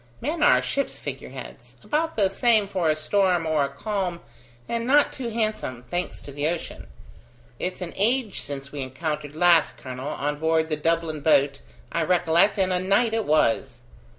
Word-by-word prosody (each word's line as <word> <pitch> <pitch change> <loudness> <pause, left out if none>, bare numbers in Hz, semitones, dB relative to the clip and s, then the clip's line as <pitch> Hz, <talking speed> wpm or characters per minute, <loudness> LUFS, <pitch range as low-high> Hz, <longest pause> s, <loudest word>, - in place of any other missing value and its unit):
Men 310 +5 -3
are - - +5
ships' 280 - -2
figure - - -7
heads, - - -10
about 320 +2 -1
the 205 -3 +3
same 215 +1 +3
for 185 -5 0
a 155 - +3
storm 180 +2 +1
or 155 -2 +2
a - - -4
calm, 180 +3 -3 0.5
and 235 0 -2
not 290 +2 +4
too 250 -3 -4
handsome, 215 - -2
thanks 175 +1 -2
to 145 - -9
the 145 +2 -1
ocean. 170 0 -4 0.7
It's 185 +1 -3
an 175 -2 -5
age 230 0 0
since 140 -1 -7
we 145 - -5
encountered 150 +2 -4
last, 170 -1 +4
colonel: 130 +1 -7
on 145 0 -3
board 160 0 +1
the 155 - +1
Dublin 165 0 0
boat, 140 -2 +3 0.3
I 170 - 0
recollect, 175 +4 +3
and 190 -1 +1
a 180 - +1
night 200 +5 +2
it 225 -1 0
was." 135 -5 +1
170 Hz, 180 wpm, -25 LUFS, 150-205 Hz, 0.7 s, are